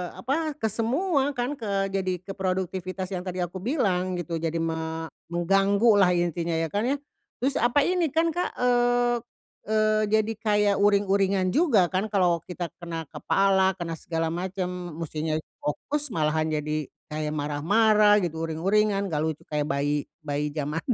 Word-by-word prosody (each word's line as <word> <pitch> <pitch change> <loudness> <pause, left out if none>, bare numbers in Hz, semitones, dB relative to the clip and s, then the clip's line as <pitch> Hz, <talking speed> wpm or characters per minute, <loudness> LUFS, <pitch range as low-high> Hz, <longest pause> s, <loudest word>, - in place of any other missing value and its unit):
apa 305 +2 -2
ke 220 -6 -2
semua 275 - 0
kan 250 +3 -2
ke 195 -3 -1
jadi 185 -2 -2
ke 195 - -7
produktivitas 185 0 -3
yang 185 - -2
tadi 180 0 -2
aku 175 +2 -5
bilang 185 - 0
gitu 170 -1 -3
jadi 165 0 -2
me 160 -1 -3 0.2
mengganggu 195 +6 +3
lah 190 -2 +5
intinya 170 -1 0
ya, 160 -1 -1
kan, 210 +4 0
ya? 275 - +2 0.5
Terus 270 +1 +1
apa 245 +5 +3
ini 360 0 +1
kan 330 +1 +3
Kak, 355 +3 -2
eee 245 0 +2 0.5
eee, 215 0 +2
jadi 215 +1 +2
kayak 210 -2 +2
uring-uringan 200 -2 +3
juga 245 - +3
kan 190 +3 0
kalo 180 -5 +2
kita 175 -3 -5
kena 170 -2 -5
kepala 190 -1 +2
kena 165 -3 -5
segala 165 -1 -2
macem 180 -1 -4
mestinya 155 -1 -3 0.2
fokus 295 - -2
malahan 155 0 +1
jadi 150 -1 -2 0.2
kayak 150 0 -3
marah-marah 205 +9 +4
gitu 165 -1 -2
uring-uringan 200 +5 +1
enggak 155 -3 -1
lucu 160 -2 -3
kayak 150 -1 0
bayi 145 -1 0 0.2
bayi 145 0 -2
jaman 150 +1 -2
185 Hz, 155 wpm, -26 LUFS, 165-215 Hz, 0.5 s, lah